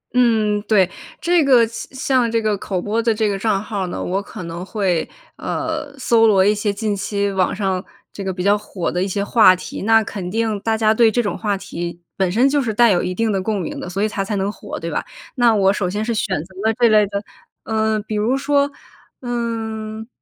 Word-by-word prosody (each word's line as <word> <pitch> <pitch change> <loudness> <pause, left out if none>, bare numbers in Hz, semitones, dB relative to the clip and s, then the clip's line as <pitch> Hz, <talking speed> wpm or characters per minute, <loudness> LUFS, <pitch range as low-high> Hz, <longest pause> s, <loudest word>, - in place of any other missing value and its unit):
嗯， 220 -4 +3
对。 195 -5 +4 0.3
这 345 0 +3
个 255 -4 +5
像 230 - -7
像 255 -3 +1
这 230 - +2
个 215 -2 0
口 190 -2 -3
播 215 +5 -1
的 230 0 +2
这 215 0 0
个 200 -1 -1
账 200 -2 +1
号 200 -4 -3
呢， - - -5
我 190 +2 -1
可 195 - -9
能 170 +1 -6
会， 190 -4 -1 0.3
呃 315 -3 -3
搜 230 -3 +4
罗 195 -3 +4
一 205 - +4
些 210 0 -1
近 210 0 -2
期 200 0 -1
网 190 -2 0
上 190 -2 -1 0.3
这 200 - -7
个 190 - -2
比 180 -1 -4
较 200 +2 +4
火 200 -3 -4
的 180 - -1
一 190 - 0
些 200 +1 -1
话 205 -3 +6
题， 185 - -7
那 225 +2 +4
肯 195 -4 -5
定 220 0 -1
大 220 +2 0
家 220 -1 +3
对 225 0 +5
这 240 - +1
种 205 - -2
话 205 -3 -1
题 175 -3 -6 0.2
本 190 -2 0
身 240 +8 +4
就 285 0 +2
是 230 - -1
带 235 +1 +5
有 175 - +2
一 185 - -2
定 225 +2 +1
的 195 -2 0
共 210 +1 -1
鸣 175 - -4
的， - - -6
所 195 +3 -2
以 - - +3
它 210 -2 -2
才 205 +2 -3
能 195 +1 -1
火 - - -8
对 - - -5
吧？ - - -1 0.3
那 240 -4 +4
我 195 -1 +4
首 195 -3 -1
先 210 +3 -2
是 235 - -1
选 215 -8 -1
择 190 +2 -17
了 225 - +3
这 240 - +6
类 210 -1 +5
的 200 +1 -4 0.4
嗯， 220 -1 0
比 215 0 -5
如 225 +6 +1
说， 280 +1 +1 0.5
嗯， 225 -3 -4
215 Hz, 250 characters per minute, -20 LUFS, 195-230 Hz, 0.5 s, 话